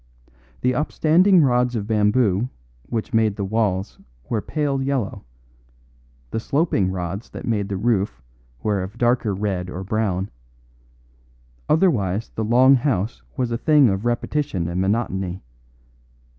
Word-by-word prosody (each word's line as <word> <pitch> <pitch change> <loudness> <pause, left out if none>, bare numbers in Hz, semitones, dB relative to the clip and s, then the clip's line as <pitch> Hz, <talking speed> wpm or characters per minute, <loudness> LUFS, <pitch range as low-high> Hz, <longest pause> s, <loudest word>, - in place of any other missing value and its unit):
The 125 - +2
upstanding 165 +5 +4
rods 125 -2 +2
of 105 -3 -2
bamboo 105 +1 +2 0.4
which 115 +1 -3
made 110 -2 +2
the 100 - -3
walls 100 -2 -1 0.3
were 110 -3 -1
pale 145 -1 -1
yellow, 135 -6 -2 1.1
the - - -1
sloping 140 - +1
rods 95 +3 -4
that - - -8
made 105 -4 -1
the 100 - -2
roof 105 -3 0 0.4
were 105 -3 0
of 95 +2 -7
darker 120 -2 +2
red 95 -3 -2
or 90 +1 -5
brown, 100 -2 -1 1.4
otherwise 115 - +2
the 110 - -2
long 125 +5 +5
house 115 - 0 0.2
was 125 -2 -1
a 115 - -1
thing 145 -2 +5
of 95 +1 -1
repetition 120 - -1
and 85 +2 -2
monotony. 95 -3 -1
110 Hz, 130 wpm, -22 LUFS, 95-125 Hz, 1.4 s, long